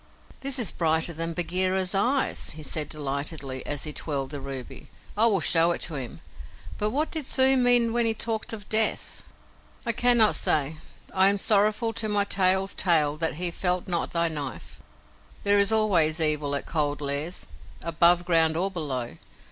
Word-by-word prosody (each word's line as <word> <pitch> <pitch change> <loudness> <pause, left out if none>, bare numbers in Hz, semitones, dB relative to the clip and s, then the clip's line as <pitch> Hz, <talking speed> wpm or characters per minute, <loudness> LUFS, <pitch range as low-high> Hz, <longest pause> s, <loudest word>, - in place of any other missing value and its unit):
"This 270 0 -1
is 230 -9 +1
brighter 160 0 0
than 165 +1 -4
Bagheera's 185 +2 -1
eyes," 245 +8 0
he 155 - -9
said 150 0 -2
delightedly, 140 -2 -4
as 145 -1 -2
he 150 - -3
twirled 140 -4 -3
the 145 -2 -7
ruby. 135 -2 -8 0.3
"I 220 +3 +4
will 200 -6 +1
show 165 +1 +4
it - - -7
to 165 - -2
him; 130 -5 -6 0.6
but 210 - 0
what 295 +7 -2
did 315 -4 -4
the - - -11
Thuu 265 0 +3
mean 245 -2 +3
when 235 -1 +1
he 225 - 0
talked 225 0 -3
of 210 -3 -8
death?" 220 0 0 0.6
"I 235 - +2
cannot 235 -1 +3
say. 150 +1 +1 0.4
I 190 0 +4
am 200 +1 +2
sorrowful 215 +2 +3
to 215 -1 -3
my 205 -1 +2
tail's 190 0 +1
tail 155 -5 +2
that 160 -1 -1
he 175 +2 0
felt 180 +1 -1
not 175 -2 -2
thy 170 0 0
knife. 145 -5 -6 0.6
There 205 0 +3
is 200 +2 +3
always 175 -8 +2
evil 150 -2 +1
at 140 - -5
Cold 145 -2 -2
Lairs 145 +4 -4 0.4
above 170 +2 +2
ground 165 -2 +2
or 190 +3 -1
below. 130 - -5
175 Hz, 180 wpm, -25 LUFS, 155-215 Hz, 0.6 s, I